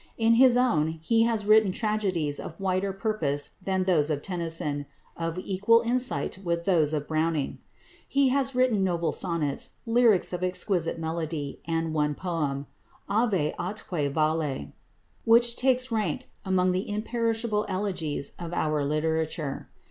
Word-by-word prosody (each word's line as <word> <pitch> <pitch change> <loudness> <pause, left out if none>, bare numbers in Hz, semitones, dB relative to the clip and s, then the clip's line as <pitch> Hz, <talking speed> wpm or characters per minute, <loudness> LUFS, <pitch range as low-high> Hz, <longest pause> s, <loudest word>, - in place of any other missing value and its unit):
In 225 0 +4
his 250 -2 +7
own 165 -11 +2
he 225 +5 +3
has 225 -3 -1
written 215 -2 +5
tragedies 190 -9 -1
of 165 - -8
wider 190 0 0
purpose 190 -9 -2
than 190 0 0
those 165 -5 +2
of 145 -2 -2
Tennyson, 165 -5 -3 0.3
of 165 0 -3
equal 200 +5 +3
insight 245 -4 -1
with 170 -1 -1
those 160 -6 +3
of 150 -2 -2
Browning. 155 -2 -1 0.5
He 275 -1 +3
has 270 0 0
written 250 -6 +3
noble 170 -4 0
sonnets, 165 -6 -2
lyrics 230 -6 +3
of 180 0 -3
exquisite 180 -2 -1
melody, 160 -3 -4
and 165 -1 -1
one 150 -1 +1
poem, 150 -6 -2 0.4
"Ave 200 -9 +1
atque 175 -5 -2
Vale," 155 - -1 0.5
which 235 +1 +5
takes 255 -1 +1
rank 210 -9 -1 0.2
among 185 -1 +2
the 185 +3 -2
imperishable 225 0 -1
elegies 180 -7 -2
of 170 0 -6
our 155 -3 0
literature. 155 0 -2
180 Hz, 140 wpm, -27 LUFS, 155-215 Hz, 0.5 s, his